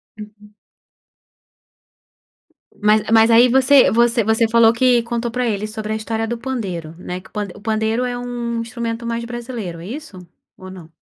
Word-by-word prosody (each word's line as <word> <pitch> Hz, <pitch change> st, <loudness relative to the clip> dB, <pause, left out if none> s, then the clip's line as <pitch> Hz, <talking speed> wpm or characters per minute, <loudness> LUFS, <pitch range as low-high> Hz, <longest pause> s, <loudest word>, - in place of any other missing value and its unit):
Uhum. 210 Hz, 0 st, -13 dB, 2.2 s
Mas 210 Hz, 0 st, +3 dB
mas 225 Hz, +1 st, +5 dB
aí 235 Hz, +2 st, +7 dB
você 265 Hz, +2 st, +5 dB
você 235 Hz, 0 st, +2 dB
você 220 Hz, +2 st, +2 dB
falou 230 Hz, 0 st, +5 dB
que 245 Hz, 0 st, +3 dB
contou 235 Hz, 0 st, -3 dB
pra 250 Hz, 0 st, -1 dB
ele 210 Hz, -1 st, -2 dB
sobre 215 Hz, 0 st, -5 dB
a -, -, -1 dB
história 225 Hz, +1 st, -3 dB
do 235 Hz, +1 st, -3 dB
pandeiro, 195 Hz, -11 st, -5 dB
né, 180 Hz, 0 st, -6 dB
que -, -, -18 dB
o -, -, -37 dB
pand 205 Hz, -2 st, -3 dB
o -, -, -13 dB
pandeiro 220 Hz, +2 st, -1 dB
é 245 Hz, -1 st, -3 dB
um 240 Hz, -1 st, -4 dB
instrumento 230 Hz, 0 st, -5 dB
mais 235 Hz, 0 st, -3 dB
brasileiro, 235 Hz, -8 st, -6 dB
é 170 Hz, -, -10 dB
isso, 260 Hz, -6 st, -8 dB, 0.4 s
ou 185 Hz, 0 st, -11 dB
não? 175 Hz, -4 st, -12 dB
230 Hz, 175 wpm, -19 LUFS, 210-240 Hz, 2.2 s, aí